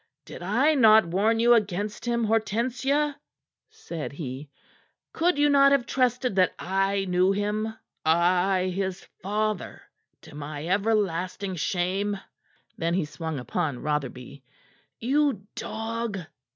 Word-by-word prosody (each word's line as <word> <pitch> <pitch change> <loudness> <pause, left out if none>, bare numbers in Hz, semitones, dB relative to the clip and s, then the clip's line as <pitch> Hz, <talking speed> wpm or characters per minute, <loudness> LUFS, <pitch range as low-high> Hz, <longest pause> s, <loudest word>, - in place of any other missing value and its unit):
"Did - - -10
I 240 - +2
not 220 - +6
warn 205 +7 +1
you 240 +1 +6
against 210 0 -1
him, 235 -1 0
Hortensia?" 250 +7 0 0.5
said 165 -3 -7
he. 140 -1 -6 0.6
"Could 340 -1 +2
you 290 0 +4
not 275 -1 +6
have 275 -3 +3
trusted 250 -3 0
that 185 -1 +3
I 195 +1 0
knew 180 +1 +3
him 210 +2 -1 0.3
I, 180 +3 +2
his 190 0 -3 0.2
father, 210 0 -2 0.4
to - - -13
my 150 +1 -6
everlasting 195 -1 0
shame?" 190 +4 -1 0.6
Then 170 +1 0
he 185 -4 0
swung 160 0 -5
upon 130 +1 -3
Rotherby. 140 -2 -4 0.5
"You 265 -4 +1
dog!" 225 -1 -4
200 Hz, 120 wpm, -26 LUFS, 175-230 Hz, 0.6 s, not